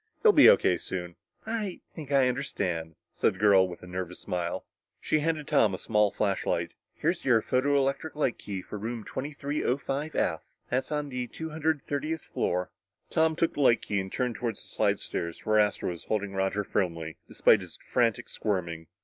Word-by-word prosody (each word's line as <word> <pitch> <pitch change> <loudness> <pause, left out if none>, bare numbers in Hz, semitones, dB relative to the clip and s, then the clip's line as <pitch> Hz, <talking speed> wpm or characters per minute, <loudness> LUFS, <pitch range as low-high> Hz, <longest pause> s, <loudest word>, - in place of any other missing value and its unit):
"He'll 440 - +8
be 295 -7 +8
O.K. 90 - +5
soon." 90 -1 -5 0.3
"I 220 -4 -3
think 150 -4 -8
I 135 -2 +5
understand," 90 - -2 0.2
said - - +1
the - - -12
girl 100 -3 +5
with 90 0 -9
a - - -8
nervous 90 0 -5
smile. 85 -1 -3 0.3
She 155 - +1
handed 155 -1 -1
Tom 105 -4 +3
a - - -6
small 105 0 +2
flashlight. 100 -1 -1 0.2
"Here's - - -1
your 120 -4 +5
photoelectric 140 +3 +1
light 140 -5 0
key 95 -3 -5
for 105 - -7
room 115 +1 -4
2305 140 +1 -2
F. - - +1 0.3
That's 130 +4 0
on 150 -1 -1
the 125 -2 -3
two 160 +6 -7
hundred 155 -2 0
thirtieth 155 +3 -2
floor." 90 +1 -1 0.4
Tom 160 0 +3
took 165 +1 +1
the 145 - -2
light 120 -4 +4
key 105 - -1
and 95 0 -4
turned 125 -3 -1
toward 115 -3 -2
the - - -11
slidestairs 85 -1 -2
where 110 0 +4
Astro 105 -3 +1
was 85 - -9
holding 105 -2 -1
Roger 95 +1 0
firmly, 85 -5 -2
despite 110 - +4
his 90 -3 -10
frantic 115 -4 0
squirming. 85 -6 -3
115 Hz, 180 wpm, -28 LUFS, 95-145 Hz, 0.4 s, He'll